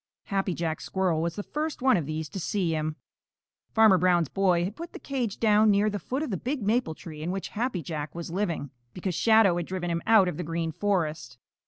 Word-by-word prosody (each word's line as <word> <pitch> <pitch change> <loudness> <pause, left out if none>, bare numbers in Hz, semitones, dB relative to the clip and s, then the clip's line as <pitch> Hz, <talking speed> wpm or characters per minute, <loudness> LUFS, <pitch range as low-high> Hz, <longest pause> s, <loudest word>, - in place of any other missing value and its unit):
Happy 195 -2 -1
Jack 160 -2 -2
Squirrel 185 -4 0
was 170 0 -2
the 205 - -4
first 305 +5 -3
one 260 -1 +5
of 165 -7 -1
these 155 0 -3
to 195 - -6
see 175 -1 -1
him. 155 0 -2 0.8
Farmer 220 -4 +6
Brown's 175 -4 +3
boy 185 -3 +2
had 195 +4 -3
put 335 +1 -8
the - - -8
cage 250 -7 -3
down 215 -1 +4
near 205 +1 +3
the 205 - -3
foot 260 - -3
of 305 - -4
the 190 - -1
big 260 - -3
maple 215 -5 +1
tree 155 -2 -9
in 165 - -3
which 190 +1 -3
Happy 220 -6 -2
Jack 150 -1 -5
was 170 -1 -6
living, 170 -7 -2 0.2
because 180 0 -3
Shadow 220 -2 +4
had 175 - -3
driven 180 -2 -3
him 170 0 -1
out 215 -4 +6
of 175 - -3
the 180 - -3
Green 165 0 -2
Forest. 155 -9 -1
185 Hz, 225 wpm, -27 LUFS, 165-210 Hz, 0.8 s, Farmer